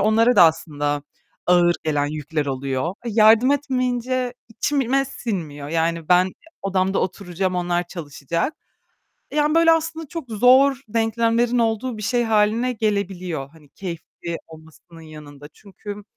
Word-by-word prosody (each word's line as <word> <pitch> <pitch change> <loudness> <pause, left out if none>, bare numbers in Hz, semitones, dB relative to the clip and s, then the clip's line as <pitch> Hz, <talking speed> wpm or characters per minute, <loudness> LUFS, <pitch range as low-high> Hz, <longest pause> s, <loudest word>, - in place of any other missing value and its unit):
onlara 225 +4 +3
da - - +9
aslında 145 -3 +1 0.4
ağır 175 -1 +4
gelen 145 -2 +1
yükler 150 0 -3
oluyor. 135 +4 -2
Eee, 235 - -3
yardım 225 +3 +6
etmeyince 255 -3 -1
içime 270 +2 0
sinmiyor, 165 - -5
yani 165 0 -1
ben 180 +1 +4 0.3
odamda 190 0 0
oturacağım 185 0 -2
onlar 175 0 0
çalışacak. 170 - -4 0.8
Yani 300 +1 +2
böyle 330 0 +6
aslında 325 0 -1
çok 330 -6 -7
zor 255 +5 +5
denklemlerin 230 +2 +1
olduğu 230 +1 0
bir 215 - -7
şey 240 +3 +1
hâline 225 +3 +2
gelebiliyor, 190 - -2
hani 155 -2 -20
keyifli 170 0 -7
olmasının 160 +1 -15
yanında 150 -2 -12
çünkü 205 +1 -10
195 Hz, 125 wpm, -22 LUFS, 165-245 Hz, 0.8 s, da